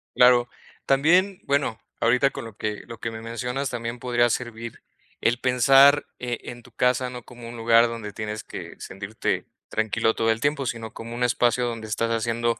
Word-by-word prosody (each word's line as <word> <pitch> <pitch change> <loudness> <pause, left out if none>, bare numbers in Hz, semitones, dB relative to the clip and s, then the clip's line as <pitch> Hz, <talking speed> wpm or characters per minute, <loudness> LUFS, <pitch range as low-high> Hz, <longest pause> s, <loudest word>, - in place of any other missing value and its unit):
Claro, 125 -1 +5 0.4
también, 180 +8 +3
bueno, 140 -5 0 0.2
ahorita 125 +4 +3
con - - -7
lo 115 -3 -10
que 105 -1 -3
lo 115 - -9
que 115 - -3
me 110 - -7
mencionas, 125 +4 -3
también 120 0 -4
podría 120 -1 +2
servir 115 -1 -4 0.4
el 120 +1 +2
pensar, 135 +3 +5
eh, 120 -1 -3
en 120 0 -9
tu 125 - -17
casa, 125 +1 +1
no 125 -1 -8
como 120 -1 -11
un 120 - -8
lugar 115 +1 +5
donde 115 -3 -6
tienes 105 +1 -5
que - - -8
sentirte 100 +3 -3 0.2
tranquilo 110 +1 +1
todo 115 - 0
el 110 - -2
tiempo, 145 0 0
sino 115 -2 -4
como 115 +1 -7
un 125 - -1
espacio 120 0 +2
donde 115 -2 -4
estás 115 +2 -1
haciendo 115 +1 0
120 Hz, 185 wpm, -24 LUFS, 115-125 Hz, 0.4 s, Claro